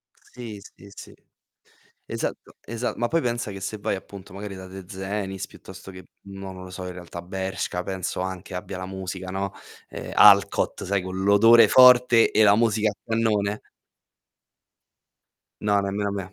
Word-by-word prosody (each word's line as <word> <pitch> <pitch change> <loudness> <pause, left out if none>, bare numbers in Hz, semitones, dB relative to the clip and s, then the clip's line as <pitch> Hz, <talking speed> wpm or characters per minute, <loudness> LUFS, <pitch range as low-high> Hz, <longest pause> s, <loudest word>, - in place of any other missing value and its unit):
Sì, 115 -5 -10
sì, 100 0 -16
sì. - - -12 0.9
Esatto - - -5
esa 115 +1 -3
ma 120 - 0
poi 165 +6 +1
pensa 120 -4 -2
che 95 - -8
se 105 +2 -5
vai 100 - -2
appunto 95 -1 -10
magari 100 0 -7
da 95 0 -9
Tezenis, 95 +1 -5
piuttosto 95 0 -13
che 90 -1 -12 0.2
non 95 -1 -9
lo 90 0 -10
so 95 0 -7
in 90 - -6
realtà, 90 -1 -9
Bershka 95 -1 -4
penso 95 -1 -4
anche 95 0 -5
abbia 90 +1 -6
la 95 - -5
musica, 95 -1 -6
no, 95 +1 -3 0.4
ehm, - - -7
Alcott 100 -1 +5
sai 100 0 0
co' 95 0 -6
l'odore 100 +4 +6
forte 125 -2 +6
e 110 - +4
la 100 0 +6
musica 110 -2 +2
a - - -10
cannone? 110 -2 0 2.0
No 100 -1 +3
nemmeno 100 +1 -2
a - - -3
me. 95 -1 -6
100 Hz, 160 wpm, -24 LUFS, 95-105 Hz, 2.0 s, l'odore